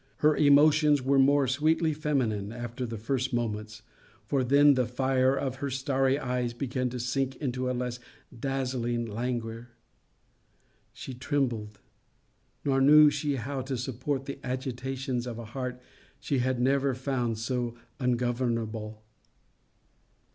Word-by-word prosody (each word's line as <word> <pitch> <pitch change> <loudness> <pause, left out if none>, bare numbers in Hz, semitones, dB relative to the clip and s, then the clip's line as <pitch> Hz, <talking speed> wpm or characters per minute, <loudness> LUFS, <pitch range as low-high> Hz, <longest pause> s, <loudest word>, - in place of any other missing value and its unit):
Her 150 0 +6
emotions 150 0 +5
were 135 +1 +3
more 140 0 +4
sweetly 155 +4 +2
feminine, 125 -9 -1
after 120 +1 -5
the 115 0 -5
first 130 +4 -2
moments; 110 -2 -3 0.4
for 130 +4 +1
then 140 +3 +6
the 125 -3 +1
fire 130 +1 +2
of 130 -2 -2
her 140 +1 -3
starry 135 0 +1
eyes 125 -3 -2
began 125 0 -2
to 125 +1 -5
sink 130 +2 -1
into 130 -2 -2
a - - 0
less 125 0 -3 0.4
dazzling 125 -3 -1
languor. 115 +1 -4 1.2
She 130 - -8
trembled: 120 -6 -2 0.9
nor 135 -1 +2
knew 150 +2 +8
she 145 0 -1
how 135 +2 -3
to 130 0 -3
support 130 +3 -3
the 140 0 -6
agitations 130 0 -3
of 120 -2 -5
a 115 - -7
heart 125 +2 -5 0.4
she 140 - -1
had 130 0 0
never 135 +1 +2
found 125 -3 -1
so 120 0 -2 0.2
ungovernable. 115 -3 -1
130 Hz, 135 wpm, -28 LUFS, 120-135 Hz, 1.2 s, knew